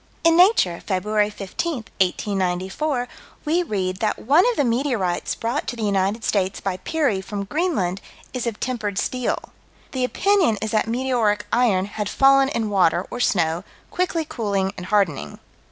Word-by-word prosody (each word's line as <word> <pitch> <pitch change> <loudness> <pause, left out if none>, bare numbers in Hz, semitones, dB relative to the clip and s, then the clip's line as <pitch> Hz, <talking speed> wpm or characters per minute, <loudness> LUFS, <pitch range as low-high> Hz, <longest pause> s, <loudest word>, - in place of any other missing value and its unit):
In 330 0 +5
Nature, 350 - +4
Feb. 210 +2 0
15, 205 - -3
1894, 195 +3 -1 0.4
we 325 +4 +2
read 190 - -2
that 215 +1 0
one 290 +9 +4
of 485 - -1
the 290 - +2
meteorites 235 -7 0
brought 230 +2 -2
to - - -3
the 230 - -5
United 200 +2 0
States 195 -2 0
by 190 -2 -2
Peary, 275 - 0
from 200 +1 -5
Greenland, 200 - -1 0.3
is 250 -2 -3
of 225 -3 -3
tempered 215 -6 -3
steel. 250 +3 -2 0.4
The 260 -2 -2
opinion 360 - +2
is 220 -1 -3
that 220 0 +1
meteoric 230 -4 0
iron 220 -6 +3
had 205 0 -4
fallen 275 0 +5
in 225 -6 -2
water 180 -2 +3
or 245 - -5
snow, 175 -7 +1 0.3
quickly 355 -3 -1
cooling 200 -7 -1
and 180 - -7
hardening. 195 -9 0
215 Hz, 155 wpm, -22 LUFS, 190-265 Hz, 0.4 s, In